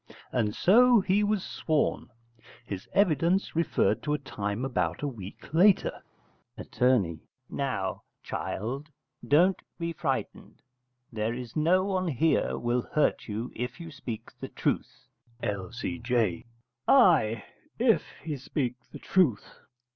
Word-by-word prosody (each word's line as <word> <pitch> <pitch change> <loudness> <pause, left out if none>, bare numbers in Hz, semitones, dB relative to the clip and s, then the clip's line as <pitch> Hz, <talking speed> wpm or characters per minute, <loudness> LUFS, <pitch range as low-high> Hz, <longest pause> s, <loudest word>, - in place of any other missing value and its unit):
And 110 -4 0
so 240 +5 +6
he 195 +2 +2
was 210 -2 +1
sworn. 155 -5 -1 0.6
His 100 -3 -7
evidence 180 -1 +2
referred 165 +1 +1
to 150 0 0
a - - -1
time 105 -4 -4
about 135 +2 -1
a - - +1
week 115 +1 -9
later. 185 +4 +4 0.6
Att. - - -11 0.7
Now, 125 -9 -2 0.2
child, 135 +9 -4 0.4
don't 180 +6 +4 0.2
be 170 -1 -3
frighted: - - -4 0.5
there 110 +1 -1
is 125 -2 -8
no 175 +5 +3
one 185 -2 0
here 160 +2 +1
will 120 +1 0
hurt 150 - +1
you 110 +3 -4
if 125 +5 -4
you 165 -1 -8
speak 125 -6 -7
the - - -5
truth. - - -2 0.4
L.C.J. 115 0 -1 0.4
Ay, 160 - +5 0.3
if - - +3 0.2
he 155 -3 -3
speak 125 -1 -2
the - - -8
truth. 160 - +1
140 Hz, 125 wpm, -28 LUFS, 115-170 Hz, 0.7 s, so